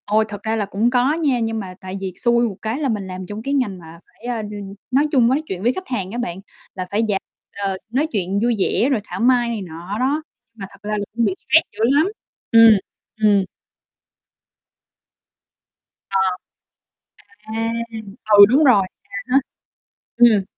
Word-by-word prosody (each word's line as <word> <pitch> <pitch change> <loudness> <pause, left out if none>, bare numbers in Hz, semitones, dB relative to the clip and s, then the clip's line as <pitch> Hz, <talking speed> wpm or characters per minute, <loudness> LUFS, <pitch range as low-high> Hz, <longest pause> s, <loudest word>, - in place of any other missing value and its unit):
Ôi, 215 +1 +2
thật 205 -1 -8
ra 220 0 0
là 210 -2 -1
cũng 205 +4 +1
có 250 +3 +2
nha, 295 -6 +1
nhưng 225 -1 -1
mà 185 -3 -7
tại 190 0 -6
vì 190 -2 -4
xui 235 0 +2
một 205 - -6
cái 220 +5 -2
là 285 -3 0
mình 205 -4 -2
làm 185 0 -6
trong 205 +3 -7
cái 275 - -2
ngành 240 -9 0
mà 165 0 -13
phải, 235 - -19
à, 235 -2 -2
n 210 - -6 0.4
nói 280 +4 +3
chung 250 -5 +4
nói 265 +5 +2
chuyện 185 -5 -5
với 240 +3 +3
khách 375 - -7
hàng 195 -7 -3
á 235 - -5
bạn, 190 -7 -3 0.4
là 185 -1 -4
phải 205 +2 +1
dạng, 195 -2 0 0.3
ờ, 195 -1 -2
nói 270 +7 +1
chuyện 195 -2 -1
vui 240 0 +2
vẻ, 235 +6 +2
rồi 240 -6 +1
thảo - - -7
mai 245 0 +3
này 225 -3 -3
nọ 175 +3 -6
đó, 280 +5 +1 0.3
nhưng 230 - -24
mà 195 - -5
thật 200 - -18
ra 210 - 0
là 205 - -2
cũng 235 0 +2
bị 195 -3 0
stress 320 +1 +3
dữ 205 - -16
lắm. 285 +8 +4 0.4
Ừm. 225 -2 +8 0.5
Ừm. 205 -2 +5 2.7
Ờ. 195 - +1 1.4
À. 225 0 -1 0.7
Ừ, 200 - +12
đúng 275 +7 +4
rồi. 240 -8 +6 0.2
À - - -10 0.2
há. 270 - +7 0.8
Ừm. 230 -5 +5
220 Hz, 195 wpm, -20 LUFS, 195-245 Hz, 2.7 s, Ừ